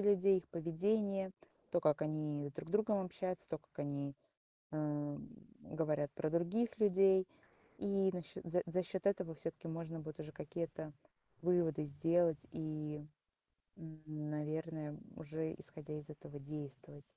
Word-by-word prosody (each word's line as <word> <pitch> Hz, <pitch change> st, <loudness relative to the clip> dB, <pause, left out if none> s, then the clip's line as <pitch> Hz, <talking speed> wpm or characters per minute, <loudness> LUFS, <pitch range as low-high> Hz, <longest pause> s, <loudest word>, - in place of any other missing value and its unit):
людей, 200 Hz, -1 st, +6 dB
их 180 Hz, -, -9 dB
поведение, 195 Hz, +4 st, +1 dB, 0.4 s
то, 175 Hz, -, +4 dB
как 150 Hz, -2 st, +4 dB
они 150 Hz, -1 st, 0 dB
друг -, -, -5 dB
с -, -, -8 dB
другом 210 Hz, -1 st, +4 dB
общаются, 185 Hz, 0 st, -3 dB
то, 160 Hz, -, -1 dB
как -, -, -28 dB
они, 140 Hz, -1 st, -1 dB, 0.6 s
ам, 150 Hz, +1 st, -1 dB, 0.4 s
говорят 150 Hz, -2 st, +1 dB
про 155 Hz, +1 st, 0 dB
других 185 Hz, +8 st, +2 dB
людей. 195 Hz, -2 st, +6 dB, 0.5 s
И 195 Hz, -1 st, +3 dB
на 180 Hz, -1 st, -2 dB
счёт -, -, -9 dB
за 180 Hz, +2 st, +2 dB
за 180 Hz, +2 st, +2 dB
счёт 185 Hz, +2 st, -3 dB
этого 185 Hz, -5 st, +2 dB
всё-таки 165 Hz, +2 st, -5 dB
можно 165 Hz, 0 st, -3 dB
будет 155 Hz, -1 st, -6 dB
уже 155 Hz, 0 st, -6 dB
какие-то 155 Hz, +1 st, -4 dB, 0.5 s
выводы 170 Hz, -3 st, +4 dB
сделать 165 Hz, +2 st, +4 dB
и, 150 Hz, -1 st, -3 dB, 0.8 s
м, 160 Hz, -1 st, -9 dB
н 150 Hz, -1 st, -3 dB
наверное, 155 Hz, 0 st, -2 dB, 0.2 s
уже, 160 Hz, +1 st, -2 dB
исходя 150 Hz, 0 st, -7 dB
из 150 Hz, -, -11 dB
этого, 145 Hz, -1 st, -8 dB
действовать. 145 Hz, -1 st, -7 dB
160 Hz, 145 wpm, -39 LUFS, 150-180 Hz, 0.8 s, людей